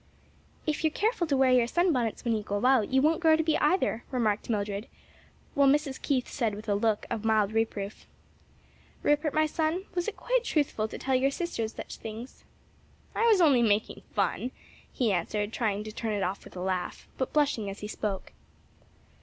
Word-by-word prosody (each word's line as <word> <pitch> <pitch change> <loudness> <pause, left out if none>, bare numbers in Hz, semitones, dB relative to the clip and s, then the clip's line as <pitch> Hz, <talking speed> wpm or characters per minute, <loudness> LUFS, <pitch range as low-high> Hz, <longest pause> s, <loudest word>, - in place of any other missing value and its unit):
"If 310 +1 -1
you're 315 - +4
careful 400 +1 0
to 280 -3 +2
wear 265 -1 +4
your 245 -2 +4
sunbonnets 255 - +1
when 230 -1 +2
you 215 - -1
go 205 +2 -2
out, 255 -5 +4
you 265 +1 +3
won't 315 +2 +3
grow 320 -2 +5
to 320 - +1
be 315 -1 +2
either," 300 -7 +1
remarked 225 -6 0
Mildred, 205 0 -2 0.7
while 280 -1 +4
Mrs. 285 -1 +1
Keith 260 -4 0
said 225 -6 -1
with 215 +2 -9
a 205 - +2
look 210 +1 +1
of 220 - -2
mild 215 -2 +2
reproof, 220 -2 -2 1.0
"Rupert, 295 +1 +2
my 310 +1 +3
son, 320 +4 -1
was 350 -1 -1
it 440 - -4
quite - - +1
truthful 285 - 0
to - - -7
tell 265 - -1
your 260 +1 +3
sisters 275 -8 -3
such - - -7
things?" 225 +3 -8 0.7
"I 465 - +2
was 425 -5 +5
only 280 -7 +5
making 215 -1 +1
fun," 250 - 0 0.4
he 235 -5 +1
answered, 205 +4 -1
trying 210 -3 -1
to 215 - -7
turn 220 0 -3
it 200 -2 -1
off 190 +2 -3
with - - -13
a 180 - -5
laugh, 185 -1 -3
but 260 - -1
blushing 280 -9 +1
as 195 - -8
he 210 - -4
spoke. 210 -2 -4
240 Hz, 195 wpm, -28 LUFS, 210-300 Hz, 1.0 s, grow